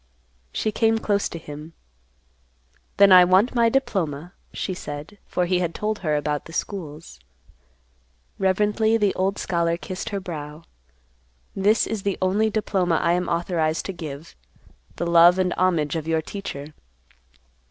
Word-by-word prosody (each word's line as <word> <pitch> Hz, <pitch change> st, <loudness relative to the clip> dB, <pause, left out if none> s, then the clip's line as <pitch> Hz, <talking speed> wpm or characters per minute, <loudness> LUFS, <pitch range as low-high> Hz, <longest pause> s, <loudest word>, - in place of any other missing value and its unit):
She 215 Hz, -, -1 dB
came 225 Hz, +1 st, +2 dB
close 205 Hz, -2 st, 0 dB
to -, -, -7 dB
him, 155 Hz, 0 st, -10 dB, 1.2 s
"Then 200 Hz, -1 st, +7 dB
I 180 Hz, -1 st, +10 dB
want 185 Hz, +6 st, +3 dB
my 235 Hz, -2 st, +3 dB
diploma," 180 Hz, -, -2 dB, 0.2 s
she 190 Hz, -, -3 dB
said, 150 Hz, +3 st, -8 dB
for 180 Hz, -, 0 dB
he 180 Hz, 0 st, +1 dB
had 170 Hz, -2 st, -2 dB
told 215 Hz, 0 st, -2 dB
her 155 Hz, -4 st, 0 dB
about 150 Hz, 0 st, -2 dB
the 165 Hz, -, -12 dB
schools. 160 Hz, -, -6 dB, 1.2 s
Reverently 210 Hz, +4 st, +2 dB
the 205 Hz, -3 st, +1 dB
old 195 Hz, +2 st, -1 dB
scholar 170 Hz, -2 st, 0 dB
kissed 185 Hz, +1 st, -6 dB
her 200 Hz, -, -3 dB
brow. 155 Hz, -4 st, -7 dB, 0.9 s
"This 205 Hz, +3 st, +3 dB
is 220 Hz, -2 st, -3 dB
the 200 Hz, 0 st, -1 dB
only 200 Hz, +4 st, +2 dB
diploma 195 Hz, -5 st, 0 dB
I 170 Hz, -, +2 dB
am 180 Hz, +1 st, 0 dB
authorized 170 Hz, -2 st, -1 dB
to 195 Hz, -, -4 dB
give—the 150 Hz, -, -10 dB
love 170 Hz, +1 st, +6 dB
and 185 Hz, -1 st, +1 dB
homage 170 Hz, -5 st, +1 dB
of 160 Hz, -1 st, -4 dB
your 160 Hz, -1 st, 0 dB
teacher." 155 Hz, -6 st, -7 dB
180 Hz, 145 wpm, -23 LUFS, 160-200 Hz, 1.2 s, I